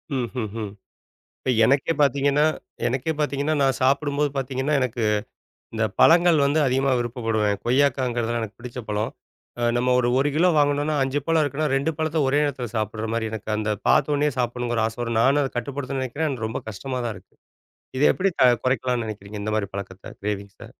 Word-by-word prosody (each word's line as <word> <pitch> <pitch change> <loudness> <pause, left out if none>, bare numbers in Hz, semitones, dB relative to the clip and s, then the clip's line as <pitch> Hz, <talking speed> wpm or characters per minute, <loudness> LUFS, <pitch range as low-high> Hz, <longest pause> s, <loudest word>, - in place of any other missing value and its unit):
ம்ஹ்ஹ்ம். 110 -3 -3 0.7
இப்ப - - -1
எனக்கே 140 +6 +2
பார்த்தீங்கன்னா 140 +1 +3 0.4
எனக்கே 135 +6 -1
பார்த்தீங்கன்னா 145 +1 0
நான் 135 -1 +2
சாப்பிடும்போது 140 +2 +2
பார்த்தீங்கன்னா 135 +2 -1
எனக்கு 120 -2 -2 0.7
இந்த 110 -1 0 0.2
பழங்கள் 170 0 +6
வந்து 145 +3 +2
அதிகமா 135 +1 +1
விருப்பப்படுவேன். 115 -4 -1
கொய்யாக்காங்கிறது 125 -2 +1
எல்லாம் 120 0 -1
எனக்குப் 110 0 -9
பிடிச்ச 125 0 -7
பழம். 105 +1 -1 0.7
நம்ம 125 +1 +2
ஒரு 120 - +1
1 140 +2 +2
கிலோ 175 +4 +4
வாங்கணும்னா 145 +1 +2
5 135 +2 -1
பழம் 165 -1 +3
இருக்கணும். 145 0 -1
2 140 +4 +1
பழத்தை 160 0 0
ஒரே 140 +2 +2
இடத்துல 135 -4 -3
சாப்பிடுற 110 0 -2
மாதிரி 115 -1 -1
எனக்கு 110 -1 -6
அந்தப் 105 -1 -2
பார்த்தவுடனே 145 +1 +3
சாப்பிடணும்ங்கிற 120 -2 -1
ஆசை 115 - -8
வரும். 115 -1 -1
நானும் 140 +4 +4
அதைக் 135 - -5
கட்டுப்படுத்துறதுன்னு 135 +1 -3
நினைக்கிறேன். 145 +5 -2
எனக்கு 120 -5 -3
ரொம்ப 110 - -4
கஷ்டமா 125 +5 -5
தான் 115 -3 -3
இருக்கு. - - -20 0.6
இதை 145 - +3
எப்படி 195 +1 0 0.3
குறைக்கலாம்னு 125 -2 0
நினைக்கிறீங்க? 105 0 -7
இந்த 110 +1 -2
மாரி 100 -3 -1
பழக்கத்தை 95 -1 -7
க்ரேவிங்ஸ்ஸ. 100 -1 -5
130 Hz, 165 wpm, -24 LUFS, 115-145 Hz, 0.7 s, பழங்கள்